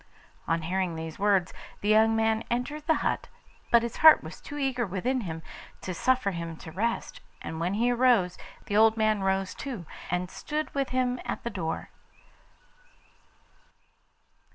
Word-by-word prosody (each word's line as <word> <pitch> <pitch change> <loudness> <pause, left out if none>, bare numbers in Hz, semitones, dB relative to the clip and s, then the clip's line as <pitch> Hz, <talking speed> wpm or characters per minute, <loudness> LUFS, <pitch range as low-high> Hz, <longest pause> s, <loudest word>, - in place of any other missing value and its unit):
On 165 0 0
hearing 180 0 -1
these 160 +1 -6
words, 195 -3 +2 0.3
the 205 - -1
young 220 +1 +5
man 225 0 +1
entered 290 +6 -3
the 320 - +4
hut, - - 0 0.4
but 235 -1 +6
his 235 -1 -4
heart 315 0 +8
was - - -9
too 290 - -8
eager 265 -3 0
within 235 +6 -1
him 165 -5 -6 0.4
to 185 - -4
suffer 250 +2 +1
him 170 -2 -5
to 160 - -10
rest, 225 +8 -2 0.2
and 160 - -6
when 180 +4 0
he 240 +3 +2
arose, 240 -8 +3 0.3
the 205 - -3
old 220 +1 +5
man 215 -2 +2
rose 190 0 0
too, 240 -11 -6 0.2
and 180 +1 -1
stood 305 0 -4
with 275 -1 -1
him 250 -1 0
at - - -4
the 235 - -3
door. 165 -6 -4
215 Hz, 160 wpm, -28 LUFS, 180-245 Hz, 0.4 s, heart